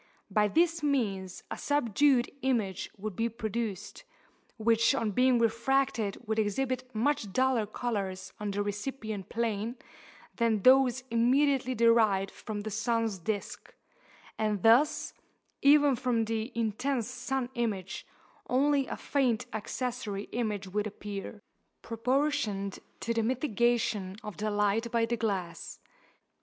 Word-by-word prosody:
By 210 Hz, -1 st, +3 dB
this 330 Hz, -, +2 dB
means 205 Hz, -11 st, -1 dB
a -, -, -3 dB
subdued 275 Hz, -2 st, +2 dB
image 225 Hz, -8 st, -1 dB
would 205 Hz, -1 st, -5 dB
be 230 Hz, +3 st, 0 dB
produced, 220 Hz, -3 st, -4 dB, 0.5 s
which 230 Hz, +3 st, +3 dB
on 225 Hz, -5 st, 0 dB
being 250 Hz, +4 st, +4 dB
refracted 230 Hz, -2 st, +1 dB
would 220 Hz, 0 st, -1 dB
exhibit 255 Hz, +4 st, -1 dB
much 225 Hz, -3 st, 0 dB
duller 255 Hz, -2 st, +2 dB
colours 195 Hz, -5 st, -3 dB
on 210 Hz, -1 st, -3 dB
the 200 Hz, +1 st, -1 dB
recipient 210 Hz, -1 st, -4 dB
plane 230 Hz, 0 st, -2 dB, 0.6 s
than 225 Hz, -4 st, +1 dB
those 260 Hz, -1 st, +5 dB
immediately 255 Hz, +2 st, +2 dB
derived 220 Hz, -4 st, +4 dB
from 210 Hz, -2 st, -6 dB
the 215 Hz, +1 st, -5 dB
sun's 225 Hz, -1 st, 0 dB
disk; 205 Hz, +4 st, -4 dB, 0.6 s
and 210 Hz, -3 st, 0 dB
thus, 260 Hz, +7 st, +4 dB, 0.5 s
even 285 Hz, -1 st, +6 dB
from 240 Hz, -2 st, 0 dB
the 225 Hz, +2 st, -2 dB
intense 230 Hz, +2 st, -1 dB
sun 250 Hz, 0 st, -3 dB
image, 205 Hz, -6 st, -3 dB, 0.4 s
only 275 Hz, +1 st, +2 dB
a -, -, -5 dB
faint 255 Hz, -6 st, 0 dB
accessory 220 Hz, -2 st, -3 dB
image 210 Hz, -5 st, -2 dB
would 210 Hz, +3 st, -1 dB
appear, 205 Hz, 0 st, -7 dB, 0.4 s
proportioned 230 Hz, -4 st, -1 dB, 0.2 s
to 230 Hz, -, -1 dB
the 230 Hz, -, +1 dB
mitigation 235 Hz, -5 st, 0 dB
of 210 Hz, -3 st, -7 dB
the 215 Hz, 0 st, -1 dB
light 210 Hz, +3 st, +1 dB
by 230 Hz, -1 st, +2 dB
the 235 Hz, +1 st, -1 dB
glass. 200 Hz, -7 st, -3 dB
230 Hz, 125 wpm, -30 LUFS, 210-255 Hz, 0.6 s, even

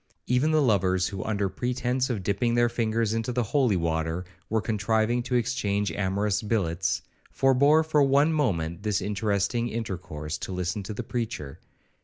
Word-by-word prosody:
Even 125 Hz, +5 st, +2 dB
the 155 Hz, -1 st, +3 dB
lovers, 95 Hz, -6 st, +2 dB
who, 95 Hz, -2 st, -5 dB
under 105 Hz, -2 st, 0 dB
pretence 125 Hz, +5 st, -1 dB
of 110 Hz, -7 st, -2 dB
dipping 110 Hz, +5 st, 0 dB
their 120 Hz, 0 st, +3 dB
fingers 115 Hz, -2 st, 0 dB
into 115 Hz, +2 st, -1 dB
the 125 Hz, 0 st, 0 dB
holy 125 Hz, -2 st, +2 dB
water, 80 Hz, +1 st, -1 dB, 0.2 s
were 110 Hz, -, +2 dB
contriving 110 Hz, +2 st, +1 dB
to 125 Hz, +1 st, -2 dB
exchange 105 Hz, -5 st, 0 dB
amorous 100 Hz, +1 st, 0 dB
billets, 95 Hz, -5 st, -1 dB, 0.3 s
forbore 140 Hz, +4 st, +4 dB
for 155 Hz, -2 st, +2 dB
one 140 Hz, +3 st, +4 dB
moment 85 Hz, -, 0 dB
this 105 Hz, -2 st, 0 dB
interesting 105 Hz, +3 st, 0 dB
intercourse, 90 Hz, -9 st, -5 dB
to -, -, -5 dB
listen 90 Hz, +2 st, -2 dB
to 100 Hz, +2 st, -6 dB
the 120 Hz, -, -4 dB
preacher. 110 Hz, -, -4 dB
110 Hz, 160 wpm, -26 LUFS, 95-125 Hz, 0.3 s, forbore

